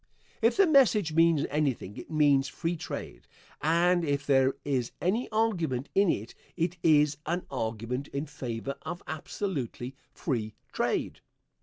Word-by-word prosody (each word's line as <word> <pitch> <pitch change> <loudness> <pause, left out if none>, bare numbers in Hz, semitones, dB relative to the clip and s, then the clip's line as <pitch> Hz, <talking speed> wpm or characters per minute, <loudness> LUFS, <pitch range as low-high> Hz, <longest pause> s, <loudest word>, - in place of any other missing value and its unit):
If 230 +7 +3
the 395 - +7
message 230 - +4
means 165 -2 +4
anything 135 -9 -1
it - - -9
means 145 -3 +4
free 165 +4 -2
trade, 160 - -7 0.3
and 170 +3 +3
if 140 -2 -1
there 135 -1 +3
is 130 -4 -1
any 215 +8 0
argument 170 - 0
in 195 -1 +4
it 110 -5 -2 0.2
it 170 +1 0
is 150 -2 +4
an 175 +2 -1
argument 115 +2 -3
in 140 +2 -3
favor 140 -3 -5
of 175 - -6
absolutely 145 - -4 0.2
free 110 -8 -3 0.2
trade. - - -1
150 Hz, 140 wpm, -29 LUFS, 135-175 Hz, 0.3 s, the